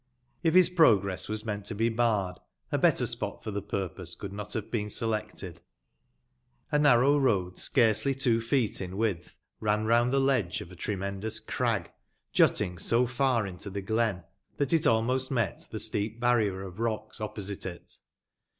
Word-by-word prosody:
If 165 Hz, 0 st, +2 dB
bis 185 Hz, -1 st, +8 dB
progress 105 Hz, -, +3 dB
was 110 Hz, +1 st, -1 dB
meant 105 Hz, -2 st, -4 dB
to 110 Hz, -, -3 dB
be 115 Hz, +3 st, +1 dB
barred, 110 Hz, -6 st, 0 dB, 0.3 s
a -, -, +1 dB
better -, -, +3 dB
spot -, -, -2 dB
for 110 Hz, -, -4 dB
tbe 100 Hz, 0 st, -5 dB
purpose 90 Hz, -2 st, -4 dB
could 100 Hz, +1 st, -7 dB
not 105 Hz, 0 st, -6 dB
bave 110 Hz, -3 st, -4 dB
been 105 Hz, -3 st, -1 dB
selected. 105 Hz, -6 st, -3 dB, 1.1 s
A 150 Hz, -, +3 dB
narrow 140 Hz, 0 st, +5 dB
road, 95 Hz, -9 st, +1 dB
scarcely 125 Hz, +2 st, +2 dB
two 120 Hz, -4 st, +2 dB
feet 115 Hz, -2 st, 0 dB
in 90 Hz, -1 st, -5 dB
widtb, 95 Hz, -4 st, -2 dB, 0.2 s
ran 105 Hz, 0 st, 0 dB
round 120 Hz, +2 st, +3 dB
tbe 135 Hz, 0 st, +3 dB
ledge 125 Hz, -11 st, +1 dB
of 85 Hz, -, -10 dB
a -, -, -11 dB
tremendous 100 Hz, +3 st, -2 dB
crag, 110 Hz, -4 st, -1 dB, 0.4 s
jutting 90 Hz, -1 st, +2 dB
so 120 Hz, +2 st, +2 dB
far 125 Hz, -2 st, +1 dB
into 95 Hz, +1 st, -7 dB
tbe 100 Hz, 0 st, -5 dB
glen 110 Hz, -4 st, 0 dB, 0.3 s
tbat 140 Hz, 0 st, 0 dB
it 160 Hz, -2 st, +3 dB
almost 125 Hz, +4 st, +2 dB
met 115 Hz, -8 st, -2 dB
tbe -, -, -4 dB
steep 105 Hz, +2 st, -2 dB
barrier 110 Hz, -6 st, +1 dB
of 95 Hz, +1 st, -9 dB
rocks 115 Hz, -2 st, -3 dB
opposite 105 Hz, -2 st, -4 dB
it. 85 Hz, -1 st, -9 dB
110 Hz, 170 wpm, -28 LUFS, 100-120 Hz, 1.1 s, bis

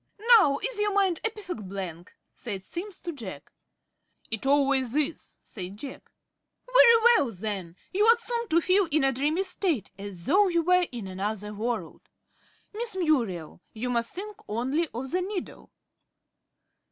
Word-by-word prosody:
"Now 280 Hz, -8 st, +3 dB
is -, -, -2 dB
your 415 Hz, 0 st, +1 dB
mind 380 Hz, -4 st, +2 dB
a 445 Hz, -, +2 dB
perfect 365 Hz, -, -7 dB
blank?" 180 Hz, -3 st, -7 dB, 0.2 s
said 200 Hz, -5 st, -4 dB
Simms 380 Hz, -, -7 dB
to 345 Hz, -, -4 dB
Jack. 215 Hz, -, -9 dB, 0.8 s
"It 220 Hz, +4 st, -3 dB
always 275 Hz, -3 st, +3 dB
is," 305 Hz, +1 st, -2 dB
said 190 Hz, -1 st, -8 dB
Jack. 265 Hz, +4 st, -9 dB, 0.5 s
"Very -, -, +7 dB
well 460 Hz, -, +5 dB
then. 190 Hz, -4 st, -4 dB, 0.2 s
You 410 Hz, +3 st, +3 dB
ought 465 Hz, +1 st, +6 dB
soon 470 Hz, 0 st, -3 dB
to 335 Hz, -2 st, +3 dB
feel 370 Hz, +2 st, +3 dB
in 305 Hz, -1 st, +2 dB
a 270 Hz, -, +5 dB
dreamy 295 Hz, +8 st, 0 dB
state, 350 Hz, -, -1 dB
as 195 Hz, -4 st, -8 dB
though 400 Hz, +2 st, +4 dB
you 340 Hz, -2 st, +1 dB
were 360 Hz, +1 st, +3 dB
in 235 Hz, -5 st, -6 dB
another 205 Hz, +2 st, -4 dB
world. 230 Hz, +3 st, -3 dB, 0.7 s
Miss 450 Hz, -1 st, -3 dB
Muriel, 235 Hz, -, 0 dB
you 245 Hz, +3 st, -3 dB
must 235 Hz, -1 st, -1 dB
think 410 Hz, +2 st, -6 dB
only 260 Hz, +10 st, 0 dB
of 255 Hz, +3 st, -5 dB
the 365 Hz, +2 st, +1 dB
needle." 380 Hz, 0 st, -6 dB
280 Hz, 155 wpm, -27 LUFS, -, 0.8 s, Very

